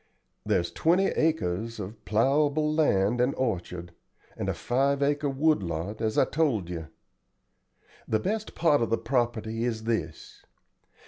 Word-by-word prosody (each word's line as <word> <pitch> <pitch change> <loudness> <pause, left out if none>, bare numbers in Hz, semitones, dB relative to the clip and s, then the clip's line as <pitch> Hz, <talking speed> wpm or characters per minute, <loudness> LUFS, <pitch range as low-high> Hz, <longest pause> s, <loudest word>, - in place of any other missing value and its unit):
There's 85 -1 0
twenty 180 +4 +2
acres 115 - -1
of 105 +2 -8
plowable 145 +7 +2
land 120 -6 +2
and 125 +3 +1
orchard, 90 -7 -3 0.4
and - - -3
a - - 0
five 140 +3 +1
acre 145 0 +1
wood 150 0 +2
lot, 85 +4 -4
as 110 -1 -1
I - - +5
told 120 - 0
you. 80 -2 -5 1.2
The 110 - +2
best 215 - -3
part 150 -6 +3
of 115 - 0
the 115 - +2
property 115 -3 -1
is 115 -2 -2
this. 100 -9 -4
115 Hz, 140 wpm, -27 LUFS, 105-145 Hz, 1.2 s, I